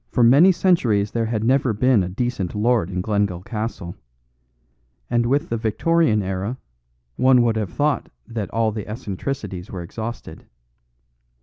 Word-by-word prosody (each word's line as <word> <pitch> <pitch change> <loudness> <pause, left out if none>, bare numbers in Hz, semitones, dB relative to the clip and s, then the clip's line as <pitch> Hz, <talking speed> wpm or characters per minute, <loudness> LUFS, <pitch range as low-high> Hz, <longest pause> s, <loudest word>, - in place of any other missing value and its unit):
For 125 - +2
many 140 +11 +7
centuries 120 - +2
there 115 -1 -1
had 110 -1 -2
never 130 0 +2
been 125 0 +3
a 90 - -2
decent 105 -2 -3
lord 110 -3 +1
in 90 -1 -2
Glengyle 100 -4 -1
Castle; 110 -6 -5 1.2
and 120 0 +2
with 140 +4 0
the 115 - -1
Victorian 115 +1 +1
era 95 +6 -3 0.6
one 130 -1 +5
would 115 -2 +1
have 105 -4 -2
thought 145 -3 0 0.2
that 110 -5 -4
all 110 -1 0
eccentricities 105 -2 -5
were 90 -3 -6
exhausted. 115 +7 -7
115 Hz, 140 wpm, -22 LUFS, 100-125 Hz, 1.2 s, many